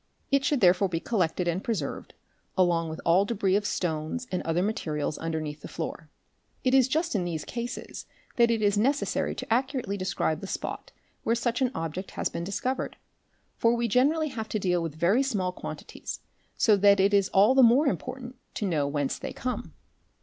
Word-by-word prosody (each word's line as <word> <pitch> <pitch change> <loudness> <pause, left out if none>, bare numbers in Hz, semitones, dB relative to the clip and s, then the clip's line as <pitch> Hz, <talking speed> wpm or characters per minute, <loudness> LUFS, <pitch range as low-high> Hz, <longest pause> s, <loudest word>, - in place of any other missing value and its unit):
It 275 -1 +3
should 290 -2 +1
therefore 185 +1 +5
be 165 -2 -1
collected 180 -4 0
and 175 +3 -1
preserved, 190 -12 -3 0.4
along 170 -3 +2
with 160 - -6
all 175 +4 +5
debris 200 -3 +1
of 205 0 +1
stones 160 +8 -2
and 180 - -1
other 165 +2 0
materials 155 -8 -2
underneath 155 -2 -4
the - - -7
floor. - - -6 0.5
It 255 - +2
is 265 -2 +6
just 320 +5 0
in 200 -5 +1
these 165 -3 -3
cases 240 0 -6 0.3
that 235 -1 +4
it 225 -2 +1
is 205 0 +3
necessary 275 +6 0
to - - -2
accurately 255 -5 -1
describe 175 -4 -1
the 195 - -6
spot - - -5 0.3
where 230 - +1
such 235 +2 -1
an 255 - +3
object 165 +4 -4
has - - 0
been 170 - -4
discovered, 250 +8 -2 0.6
for 230 +1 +3
we 235 0 0
generally 295 +7 +2
have 220 -4 -5
to - - -1
deal 180 -3 +1
with 165 -3 -4
very 180 +10 +3
small 205 -9 0
quantities, - - -7 0.4
so 215 - +5
that 200 0 +5
it 195 +2 +3
is 200 -2 +3
all 200 +6 +5
the 265 - +6
more 250 +5 +6
important 255 -2 -3 0.2
to 210 - -2
know 155 -7 +1
whence 145 -1 -1
they - - -5
come. 250 0 -4
200 Hz, 190 wpm, -27 LUFS, 170-245 Hz, 0.6 s, is